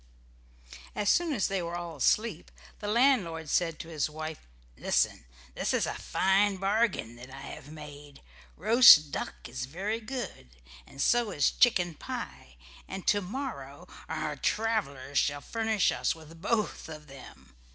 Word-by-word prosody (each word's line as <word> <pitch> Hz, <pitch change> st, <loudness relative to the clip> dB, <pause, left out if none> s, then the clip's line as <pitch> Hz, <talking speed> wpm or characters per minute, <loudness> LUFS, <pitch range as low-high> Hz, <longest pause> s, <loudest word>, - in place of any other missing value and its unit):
As 205 Hz, -1 st, 0 dB
soon 345 Hz, -2 st, +2 dB
as 225 Hz, -9 st, +1 dB
they 195 Hz, -2 st, -1 dB
were 170 Hz, 0 st, -4 dB
all 170 Hz, -2 st, -5 dB
asleep 210 Hz, -, +1 dB, 0.3 s
the 205 Hz, -, -5 dB
landlord 205 Hz, -, +2 dB
said 165 Hz, -3 st, +1 dB
to -, -, -8 dB
his 155 Hz, -2 st, -1 dB
wife, 155 Hz, -, -7 dB, 0.3 s
"Listen! -, -, 0 dB, 0.3 s
This -, -, -1 dB
is -, -, +1 dB
a -, -, -3 dB
fine 195 Hz, +1 st, +2 dB
bargain 195 Hz, -, 0 dB
that 125 Hz, +2 st, -11 dB
I 135 Hz, +1 st, -10 dB
have 140 Hz, +1 st, -9 dB
made. 145 Hz, -, -11 dB, 0.3 s
Roast 220 Hz, -, +8 dB
duck -, -, -5 dB
is 130 Hz, +1 st, -5 dB
very 195 Hz, -, -3 dB
good, 225 Hz, -, -7 dB, 0.3 s
and 135 Hz, -, -15 dB
so 240 Hz, -, +3 dB
is 145 Hz, -8 st, +2 dB
chicken 180 Hz, -8 st, +3 dB
pie, 65 Hz, -, -7 dB, 0.3 s
and 190 Hz, -1 st, -7 dB
to 205 Hz, -, +3 dB
morrow 180 Hz, -, -6 dB, 0.2 s
our 155 Hz, -2 st, -3 dB
travelers 145 Hz, -8 st, -1 dB
shall 145 Hz, 0 st, 0 dB
furnish 220 Hz, +4 st, +1 dB
us -, -, 0 dB
with 165 Hz, +1 st, -14 dB
both 215 Hz, -4 st, -1 dB
of 155 Hz, -1 st, -9 dB
them. 130 Hz, -, -14 dB
170 Hz, 150 wpm, -29 LUFS, 145-215 Hz, 0.3 s, Roast